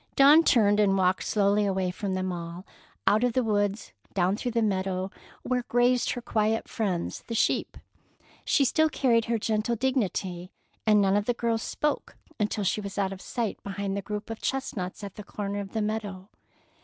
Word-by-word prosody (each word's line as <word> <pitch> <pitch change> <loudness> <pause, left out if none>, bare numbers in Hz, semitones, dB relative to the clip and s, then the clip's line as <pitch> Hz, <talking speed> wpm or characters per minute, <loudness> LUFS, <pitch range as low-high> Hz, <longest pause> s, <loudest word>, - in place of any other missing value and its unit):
Dawn 290 +4 +7
turned 210 -8 +4
and 195 -2 +4
walked 185 0 +2
slowly 205 0 +2
away 190 -2 0
from 190 +1 -3
them 185 0 -1
all, 170 +1 -6 0.4
out 215 +3 +4
of 245 -2 +2
the 255 - +2
woods, 205 -1 -1 0.2
down 185 +1 +2
through 245 +3 -3
the 230 -1 +2
meadow, 190 -2 -1 0.3
where 255 -1 0
grazed 245 +1 +2
her 245 - -5
quiet 220 0 0
friends, 195 -8 -2
the 230 - -3
sheep. 230 - +1 0.7
She 280 - +3
still 315 +5 +3
carried 235 -6 +2
her 235 0 0
gentle 220 +2 0
dignity, 195 -8 -1 0.4
and 210 -1 +6
none 195 0 +3
of 205 0 +1
the 245 - 0
girls 230 -1 0
spoke 300 +4 -2 0.2
until 210 0 0
she 200 +2 0
was 200 -1 -7
out 195 -1 0
of 190 - -10
sight 230 -4 -3
behind 200 0 -3
the 200 - -2
group 210 +2 -5
of 225 - -7
chestnuts 210 -8 -3
at 200 0 -8
the 210 - -7
corner 205 0 -4
of 195 -1 -7
the 220 -1 0
meadow. 210 -3 -4
210 Hz, 190 wpm, -27 LUFS, 195-230 Hz, 0.7 s, Dawn